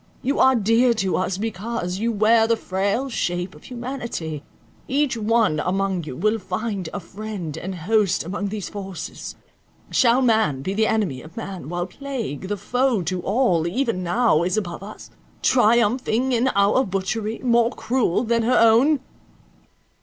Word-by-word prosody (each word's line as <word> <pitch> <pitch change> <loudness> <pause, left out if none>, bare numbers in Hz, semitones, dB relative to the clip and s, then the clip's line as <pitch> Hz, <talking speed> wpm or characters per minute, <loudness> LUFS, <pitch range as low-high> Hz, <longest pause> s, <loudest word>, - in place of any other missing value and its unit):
You 275 +3 0
are 265 0 +6
dear 230 +2 +3
to 195 -4 0
us, 185 0 -1
because 205 -3 -3
you 230 +2 0
wear 220 +1 +4
the 230 0 +2
frail 200 +7 -1
shape 180 -6 -2
of - - -16
humanity; 235 - -5 0.4
each 275 -1 +1
one 220 -7 +2
among 190 0 -1
you 140 - -6
will 215 - +1
find 195 -1 -3
a 205 - -4
friend 195 -3 -6
and 185 +3 -5
host 195 +2 +1
among 200 +3 -3
these 205 -3 -4
forces. 195 -3 -7 0.6
Shall 250 0 +4
man 220 - +2
be 190 - -2
the 220 +2 +2
enemy 185 -13 0
of 160 +6 -14
man, 190 -9 -6
while 175 0 -2
plague, 225 - -5
the 205 +1 -2
foe 245 -1 0
to 180 +2 -2
all, 190 -6 +1
even 230 0 -1
now 180 -1 +2
is 180 +4 0
above 175 -5 -3
us, 205 +2 -10 0.3
triumphing 240 +1 +3
in 245 +1 +2
our 200 +6 +4
butchery, 210 +2 -2
more 235 -2 +3
cruel 230 -4 0
than 230 0 +1
her 245 +2 +2
own?" 245 +6 +5
215 Hz, 160 wpm, -22 LUFS, 185-235 Hz, 0.6 s, are